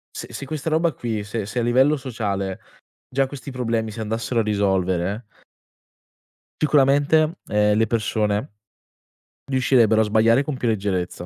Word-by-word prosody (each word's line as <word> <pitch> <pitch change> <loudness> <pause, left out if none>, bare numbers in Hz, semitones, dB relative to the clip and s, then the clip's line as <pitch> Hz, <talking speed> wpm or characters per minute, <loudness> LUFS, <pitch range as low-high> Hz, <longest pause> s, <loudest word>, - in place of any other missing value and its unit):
se - - -8
se 135 - -6
questa 155 +2 -4
roba 160 +1 +1
qui, 115 -4 -3
se 105 0 -4
se 110 +4 -3
a 120 - 0
livello 130 +5 +3
sociale 100 -8 -3 0.5
già 135 0 +2
questi 140 0 -8
problemi 115 -3 -2
si 110 - -9
andassero 115 +2 -2
a - - +2
risolvere 100 0 0 1.4
sicuramente, 150 +3 +3
ehm, 105 0 +2
le 110 - +2
persone 105 -1 0 1.0
riuscirebbero 125 -4 +3
a - - +4
sbagliare 110 +4 +3
con 145 -1 -4
più 125 - -2
leggerezza, 95 -5 -2
115 Hz, 145 wpm, -22 LUFS, 105-135 Hz, 1.4 s, a